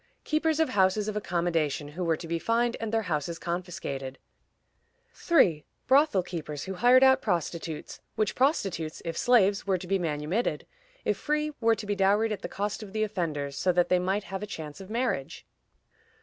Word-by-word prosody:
Keepers 310 0 +1
of 320 - +3
houses 200 +1 +2
of 215 - -3
accommodation, 170 -7 -1
who 175 +5 -5
were 165 -2 +1
to 165 - -8
be 165 0 -1
fined, 235 +5 +1
and 225 -1 -3
their 225 0 +1
houses 165 -2 -2
confiscated. 170 -7 -4 1.0
3. 170 - +3 0.2
Brothel 265 -8 +4
keepers 155 -5 -5
who 190 - -5
hired 245 +7 +5
out 265 0 +6
prostitutes, 170 -4 -3
which 215 -2 0
prostitutes, 195 - 0
if 165 -1 -3
slaves, 205 -5 +3
were 190 -1 +2
to 180 - -8
be 195 +2 0
manumitted; 160 +6 -1 0.4
if - - +1
free, 300 0 -1
were 225 0 +4
to 215 - -7
be 205 0 -1
dowried 205 +3 +3
at 205 -2 -3
the - - -5
cost 205 +2 -3
of 205 -2 -9
the 215 0 0
offenders, 155 -9 -2
so 185 - +2
that 175 0 +2
they 180 - +4
might 190 +3 0
have 195 0 -6
a 210 - -4
chance 155 -3 -7
of 190 - -11
marriage. 230 - -2
190 Hz, 185 wpm, -28 LUFS, 165-225 Hz, 1.0 s, out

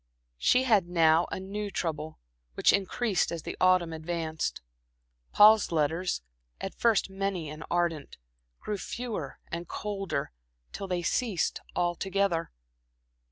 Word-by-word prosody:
She 250 - +4
had 215 -8 +3
now 165 -1 +4
a - - -3
new 205 +2 -4
trouble, 155 -4 -3 0.4
which - - +4
increased 200 0 +1
as 170 -2 -4
the - - -5
autumn 185 -3 +4
advanced. 160 -1 -3 0.7
Paul's 215 -1 +7
letters, 160 - 0 0.4
at - - -5
first 225 -4 +2
many 190 -5 -2
and 155 +1 -8
ardent, 170 -4 -1 0.4
grew 210 -2 -4
fewer 220 - -5
and 170 +1 -4
colder, 195 -8 -3 0.4
till 195 - -5
they 180 -2 -1
ceased 215 -3 0
altogether. 175 0 0
180 Hz, 120 wpm, -29 LUFS, 165-200 Hz, 0.7 s, Paul's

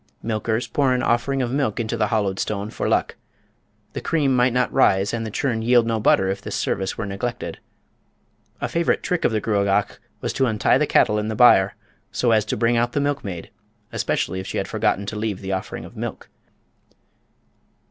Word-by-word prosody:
Milkers 110 +1 -1
pour 135 -3 +1
an 125 0 0
offering 130 +3 +1
of 120 - -2
milk 135 -6 0
into 110 -2 -2
the 105 - +1
hollowed 100 -3 0
stone 105 0 -3
"for - - -2
luck." - - 0 0.8
The - - -4
cream 145 -5 +1
might 125 0 +3
not 125 0 0
rise 95 +1 +3
and 115 -1 -2
the - - -4
churn 115 0 -1
yield 120 0 +4
no 115 -1 0
butter 95 -2 +3
if 100 +1 -3
this 105 -1 -5
service 95 -2 -2
were 110 - -3
neglected. 115 +5 -4 1.0
A - - 0
favourite 170 0 0
trick 180 -1 -1
of - - +3
the 110 - +1
Gruagach 100 -1 0 0.2
was - - -3
to 135 - +1
untie 110 -2 +2
the - - +1
cattle 105 0 +3
in 105 - -2
the 110 - -2
byre, 100 -5 +5 0.4
so 120 - +1
as 110 -2 +3
to - - -2
bring 120 0 +2
out 120 0 +1
the - - +1
milkmaid, 135 - -3 0.4
especially 95 +2 -1
if 95 - -6
she - - -4
had - - -1
forgotten 100 - 0
to 100 - -5
leave 105 -2 -2
the 95 0 -5
offering 95 - -4
of - - -13
milk. - - -6
110 Hz, 200 wpm, -22 LUFS, 100-125 Hz, 1.0 s, byre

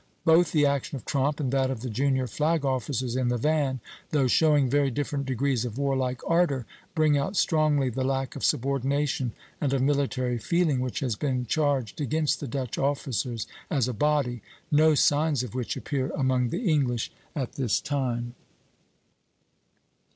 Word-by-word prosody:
Both 165 0 +5
the 150 -2 +3
action 140 0 0
of 130 - -8
Tromp 140 +2 0
and 135 -4 -1
that 135 -1 +1
of 130 -4 -4
the 130 - -4
junior 130 +2 +1
flag 155 +3 0
officers 130 -2 -1
in 130 -1 +1
the 120 0 +1
van, 140 -1 0 0.3
though 145 -3 +2
showing 145 +1 +4
very 140 +2 +2
different 140 +1 -3
degrees 130 -1 0
of 120 -1 -5
warlike 130 -3 -1
ardor, 165 -7 +2 0.3
bring 155 -3 +3
out 190 +8 -2
strongly 155 -4 +2
the 130 +3 -2
lack 135 -1 -1
of - - -6
subordination 135 0 0 0.3
and 140 - +1
of 135 - +1
military 135 -3 0
feeling 160 +2 +1
which 125 -1 -3
has 125 -5 -1
been 130 +1 -1
charged 140 -2 0
against 150 0 0
the 145 - -5
Dutch 130 -1 -3
officers 130 -4 -1 0.2
as 135 -6 +1
a 125 - -2
body; 130 -2 0 0.3
no 155 +1 +5
signs 145 -1 +2
of 120 - -7
which 125 -2 -3
appear 135 -2 -2
among 130 -3 +1
the 225 - -2
English 130 -7 +1 0.2
at 135 -5 -2
this 125 -6 0
time. 125 -4 -2
135 Hz, 165 wpm, -27 LUFS, 125-145 Hz, 0.3 s, Both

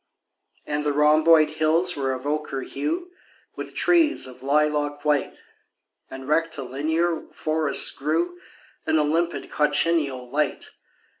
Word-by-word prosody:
And 150 0 -2
the 145 -1 0
rhomboid 155 +1 +5
hills 160 +3 +2
were 135 -2 -1
of 130 +1 -5
ochre 145 -2 -2
hue 340 - -4 0.4
With - - -8
trees 330 - +3
of 130 -1 -11
lilac 145 +1 0
white, 150 -1 0 0.7
And 135 0 -9
rectilinear 160 +2 -1
forests 155 -2 0
grew 170 +4 -2 0.5
In 160 0 +3
a 150 - +3
limpid 165 +3 -1
cochineal 145 -3 +1
light. 150 0 -2
150 Hz, 120 wpm, -24 LUFS, 145-165 Hz, 0.7 s, rhomboid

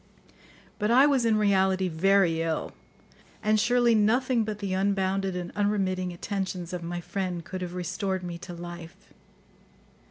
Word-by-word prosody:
But 210 0 0
I 255 +4 +6
was 275 -5 +2
in 220 -2 +3
reality 190 -2 +2
very 175 0 +2
ill, 165 -1 -2 0.7
and 215 0 +3
surely 240 +1 +3
nothing 235 +3 +2
but 215 -1 -4
the 200 -2 -3
unbounded 195 0 0
and 175 -1 -4
unremitting 190 -3 0
attentions 185 -1 -4
of 180 - -3
my 175 +1 -4
friend 175 -1 -4
could 185 -1 -6
have 180 0 -5
restored 185 +1 -2
me 175 -1 -6
to 175 - -8
life. 175 -1 -10
190 Hz, 150 wpm, -27 LUFS, 175-210 Hz, 0.7 s, I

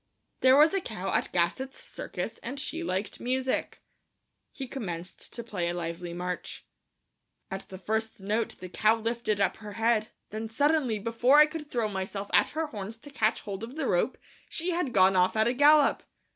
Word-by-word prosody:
"There 260 +1 +6
was 305 +3 +6
a 390 - +1
cow 205 - -4
at - - 0
Gassot's 185 +10 0
Circus - - -6
and 275 - -5
she 325 +4 -4
liked 190 - -3
music." 260 +1 -1 0.7
He 270 -3 -6
commenced 180 -9 -6
to 235 - -5
play 185 -7 -2
a 175 - -2
lively 170 0 -4
march. 180 +1 -5 0.9
At 190 0 -6
the 190 - -8
first 220 +4 -2
note 215 +4 -1
the 185 - -6
cow 215 +4 +3
lifted 230 -2 -1
up 195 - +2
her 210 -1 -9
head; 225 -1 +2 0.2
then 220 +1 -4
suddenly, 285 -1 +2
before 230 +6 +3
I 300 - +10
could 305 -1 -7
throw 235 -5 0
myself 195 0 -4
at - - +5
her 320 - +1
horns 215 -5 -6
to 290 +5 -13
catch 220 -5 +1
hold 200 0 -6
of 240 +4 -7
the 310 -3 -2
rope, 185 +4 +1 0.3
she 345 +2 -2
had 340 -6 -1
gone 190 -2 +5
off 180 +2 +3
at 220 +1 +4
a 240 - +2
gallop. 290 +2 +5
225 Hz, 185 wpm, -28 LUFS, 195-265 Hz, 0.9 s, I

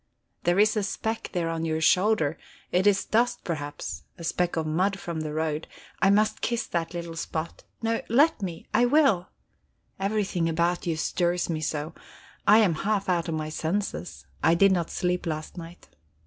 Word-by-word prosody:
"There 175 +1 +3
is 215 +2 +4
a 210 - +1
speck 220 +2 -3
there 170 -3 -1
on 165 0 -3
your 160 -1 0
shoulder; 170 -2 +3 0.3
it 185 +3 +3
is 195 -1 +3
dust, 240 +2 +1
perhaps, 145 -4 -4 0.2
a 170 - -9
speck 175 +1 0
of 160 -1 -1
mud 185 +6 +1
from 170 -4 -5
the 155 -1 -4
road; 155 0 -2 0.3
I 195 - +5
must 210 +2 +2
kiss 235 -1 -1
that 170 0 -3
little 170 -1 -5
spot. 160 +1 -5 0.2
No 225 0 0
let 280 +4 +4
me 175 -4 -5
I 245 - +5
will. 245 - +3 0.7
Everything 195 -4 0
about 170 +2 0
you 165 -2 0
stirs 175 +1 0
me 155 -1 -2
so! 155 +1 -3 0.5
I 210 - +8
am 210 -6 +4
half 200 -2 0
out 170 -2 +1
of 160 - -1
my 155 0 -3
senses. 175 +4 -3 0.2
I 165 - +4
did 195 +3 +5
not 175 -3 0
sleep 180 -1 -1
last 155 -1 -4
night." 170 0 -10
175 Hz, 180 wpm, -26 LUFS, 165-205 Hz, 0.7 s, I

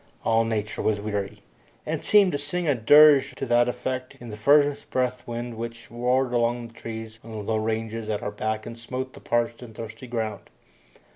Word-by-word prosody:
All 115 0 +3
nature 110 -1 -2
was 105 -1 +1
weary, 100 -1 -4 0.4
and - - -3
seemed 205 -3 +5
to 145 - -2
sing 165 +4 -3
a 145 - +4
dirge 145 +4 +6
to - - -4
that 120 0 +3
effect 130 +1 -4
in 120 -2 -9
the - - -6
furnace 145 +5 +4
breath 125 -1 -2
wind 120 0 -5
which 115 0 -7
roared 125 +2 +1
among 120 0 0
the - - -20
trees 110 -1 -8
on 115 - -12
the 110 - -6
low 110 +2 0
ranges 110 0 -2
at 105 -1 -2
our 105 - -2
back 110 +1 -3
and 115 - -8
smote 130 +2 -5
the - - -12
parched 120 0 -1
and 115 -3 -11
thirsty 115 +3 -8
ground. 110 -4 -4
115 Hz, 200 wpm, -25 LUFS, 110-130 Hz, 0.4 s, dirge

